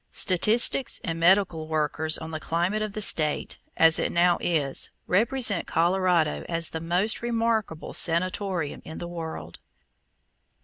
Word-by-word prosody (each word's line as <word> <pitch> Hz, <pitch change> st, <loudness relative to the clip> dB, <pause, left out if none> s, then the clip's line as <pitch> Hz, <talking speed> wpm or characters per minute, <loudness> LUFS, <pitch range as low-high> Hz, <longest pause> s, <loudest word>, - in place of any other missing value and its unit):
Statistics 220 Hz, +7 st, +2 dB
and 165 Hz, -1 st, -4 dB
medical 175 Hz, -2 st, +2 dB
workers 155 Hz, 0 st, 0 dB
on 160 Hz, 0 st, -8 dB
the 155 Hz, -, -5 dB
climate 175 Hz, +7 st, -1 dB
of 215 Hz, -1 st, -4 dB
the 215 Hz, -, -1 dB
State 155 Hz, -5 st, +1 dB, 0.2 s
(as 165 Hz, 0 st, +5 dB
it -, -, -1 dB
now 175 Hz, 0 st, +2 dB
is) 145 Hz, -6 st, -1 dB, 0.2 s
represent 220 Hz, 0 st, +1 dB
Colorado 175 Hz, -2 st, +1 dB
as 165 Hz, -1 st, -2 dB
the 160 Hz, -, -4 dB
most 180 Hz, +6 st, -1 dB
remarkable 230 Hz, -8 st, -2 dB
sanatorium 180 Hz, -1 st, -1 dB
in 160 Hz, -, -9 dB
the 175 Hz, -, -6 dB
world. 160 Hz, -, -8 dB
170 Hz, 135 wpm, -25 LUFS, 160-200 Hz, 0.2 s, as